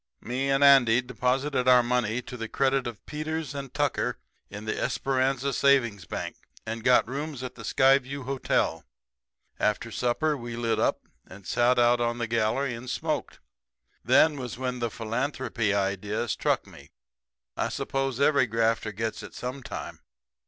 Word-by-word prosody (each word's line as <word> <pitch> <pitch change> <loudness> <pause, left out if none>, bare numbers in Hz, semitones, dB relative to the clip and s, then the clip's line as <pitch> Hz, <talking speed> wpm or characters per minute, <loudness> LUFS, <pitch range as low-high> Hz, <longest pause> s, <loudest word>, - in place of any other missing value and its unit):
"Me 130 +3 -2
and 135 +1 +3
Andy 130 -4 +7
deposited 125 +2 -1
our 125 -1 +7
money 120 -1 0
to 125 - -8
the 115 -2 -5
credit 135 -2 +1
of 115 -4 -8
Peters 155 -1 -4
and 140 -2 -6
Tucker - - -1 0.3
in 105 +1 -8
the 110 - -1
Esperanza 135 0 0
Savings 120 -10 +2
Bank, - - -5 0.3
and 115 0 -5
got 125 0 +4
rooms 140 +1 -5
at 130 -1 -5
the 125 - -12
Skyview 135 +3 +2
Hotel. 135 0 0 0.8
After 105 +2 0
supper 125 +7 0
we 120 -3 -6
lit 115 -1 0
up, - - +1 0.3
and 95 0 -13
sat 120 +4 +2
out 120 0 +4
on 120 0 0
the 120 - -1
gallery 115 +4 0
and 120 +2 -7
smoked. 130 - -3 0.6
Then 150 -2 +4
was 125 -3 -6
when 125 -1 -3
the 120 -1 -1
philanthropy 115 0 -2
idea 100 +3 -1
struck - - 0
me. - - -15 0.7
I - - -1
suppose 135 -2 -2
every 140 -2 +4
grafter 115 -1 0
gets 110 +2 -3
it - - -10
sometime. 125 +1 -6
125 Hz, 155 wpm, -27 LUFS, 115-135 Hz, 0.8 s, Andy